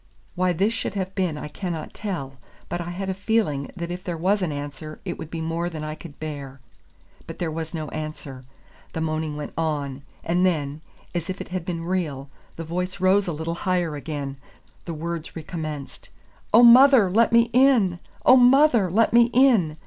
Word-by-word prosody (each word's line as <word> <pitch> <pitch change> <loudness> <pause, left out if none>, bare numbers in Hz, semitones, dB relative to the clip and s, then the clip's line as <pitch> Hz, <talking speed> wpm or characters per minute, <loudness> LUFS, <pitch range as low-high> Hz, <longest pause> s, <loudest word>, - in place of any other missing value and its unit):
Why 180 0 +1
this 195 +6 +1
should 215 - -4
have 190 -1 -3
been 180 -6 -1
I 150 - -6
cannot 165 +1 -5
tell, 140 -11 -5 0.3
but 175 - -3
I 175 - -5
had 190 +2 -4
a 190 - -1
feeling 195 -8 0
that 170 -1 -5
if 180 +1 -6
there 175 -2 -4
was 195 +5 +1
an 175 -4 -1
answer 145 +1 -7
it - - -4
would 160 - -7
be 165 -1 -5
more 165 +2 -2
than 155 -3 -6
I 155 0 -4
could 155 -1 -12
bear. 140 -3 -6 0.7
But - - -8
there 170 -2 -2
was 160 +1 -5
no 155 -1 -4
answer; 155 -4 -7 0.5
the 160 - -3
moaning 155 -1 -2
went 150 - -6
on, 145 -4 -2 0.2
and 175 +2 +1
then, 150 -5 0 0.3
as 175 -1 -3
if 185 - -4
it - - -7
had 180 -2 -4
been 170 -2 -3
real, 150 -7 -3 0.2
the 165 - -6
voice 180 +3 -3
rose 190 +2 +3
a - - 0
little 160 +2 -3
higher 175 -3 -1
again, 145 -2 -5 0.5
the 170 - -4
words 165 0 -5
recommenced, 155 -3 -6 0.4
"Oh, 230 +3 +7
mother, 250 -2 +8
let 230 +4 +4
me 235 0 +4
in! 240 -9 +4 0.3
oh, 255 - +8
mother, 250 -5 +5
let 220 +6 +2
me 235 0 +6
in!" 225 - +4
170 Hz, 195 wpm, -24 LUFS, 155-190 Hz, 0.7 s, mother